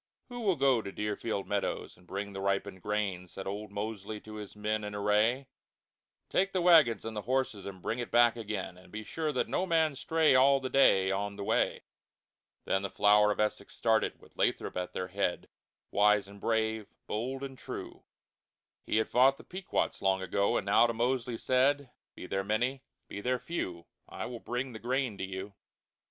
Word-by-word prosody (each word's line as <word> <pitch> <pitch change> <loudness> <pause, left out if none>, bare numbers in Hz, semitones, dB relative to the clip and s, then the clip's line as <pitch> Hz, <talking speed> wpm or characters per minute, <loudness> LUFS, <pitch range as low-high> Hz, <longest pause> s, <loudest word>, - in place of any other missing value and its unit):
"Who 245 0 -6
will 200 -6 +2
go 135 -4 +3
to 100 - -6
Deerfield 105 0 -3
Meadows 100 -1 -2
and 90 0 -22
bring 100 +2 -4
the 95 - -5
ripened 100 -1 -1
Grain?" 100 -3 -2
Said 95 +2 -8
old 105 +2 -4
Mosely 105 0 -5
to 110 - -11
his 105 -1 -8
men 105 +1 -1
in 105 0 -5
Array. 105 +6 +2 0.8
"Take 195 +1 +1
the 185 - +1
Wagons 155 - +6
and 115 -1 -5
the 105 - -2
Horses, 125 -5 -1
and 95 -2 -9
bring 115 - -2
it 120 - -3
back 120 -1 +5
again; 110 -5 -4
But - - -18
be 110 +1 -6
sure 155 +7 -2
that 130 - 0
no 185 - -1
Man 160 -4 +2
stray 160 +2 +3
All 135 +2 +6
the 130 -1 -5
Day, 95 -8 +5
on 100 +1 -2
the 100 - -5
Way." - - +1 0.8
Then 95 - +1
the 100 - -3
Flower 105 0 +5
of - - -3
Essex 105 0 -1
started, 110 -1 +1
with - - -20
Lathrop - - 0
at 90 0 -3
their 90 0 -3
head, 95 -2 -1 0.4
Wise 105 -1 +4
and 100 0 -13
brave, 110 -2 0 0.2
bold 130 +5 -3
and 135 -1 -6
true. - - -8 0.8
He - - +1
had 110 - +2
fought 135 +2 +4
the - - -13
Pequots 185 +1 -2
long 95 -1 +2
ago, 100 +2 +1
and - - -2
now 105 +4 +5
to 115 - -1
Mosely 120 0 0
said, 130 +2 +2 0.2
"Be - - -8
there 95 +1 -1
Many, 120 +6 0 0.3
be 100 - -6
there 125 +3 +1
Few, 90 - -4 0.2
I - - -5
will 120 -1 -6
bring 125 +3 -3
the 110 - -7
Grain 125 -1 -1
to - - -3
you." 95 +1 -5
110 Hz, 195 wpm, -31 LUFS, 100-130 Hz, 0.8 s, Wagons